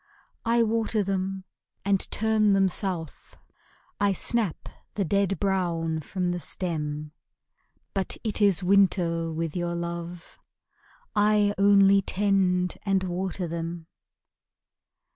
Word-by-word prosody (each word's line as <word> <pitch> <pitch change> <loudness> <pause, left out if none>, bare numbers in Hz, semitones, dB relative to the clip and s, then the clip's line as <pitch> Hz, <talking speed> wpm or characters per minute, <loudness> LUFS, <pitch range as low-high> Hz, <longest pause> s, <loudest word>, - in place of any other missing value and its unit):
I 230 +1 +3
water 225 -1 0
them 190 0 -2 0.4
and 200 -1 +1
turn 215 -1 +2
them 195 -1 +4
south, 175 -5 -4 0.6
I 205 -1 +2
snap 210 -1 -1 0.3
the 200 - 0
dead 195 +1 0
brown 170 -5 0
from 180 +3 -2
the 175 - -3
stem; 150 -4 -4 0.8
But 195 -2 -2
it 220 -1 -1
is 195 -3 +4
winter 180 -4 +2
with 160 0 -3
your 175 -1 -2
love, 170 0 -6 0.8
I 210 0 +3
only 200 0 +6
tend 190 -2 +1
and 195 -2 +1
water 185 0 -3
them. 165 0 -5
190 Hz, 110 wpm, -26 LUFS, 170-200 Hz, 0.8 s, only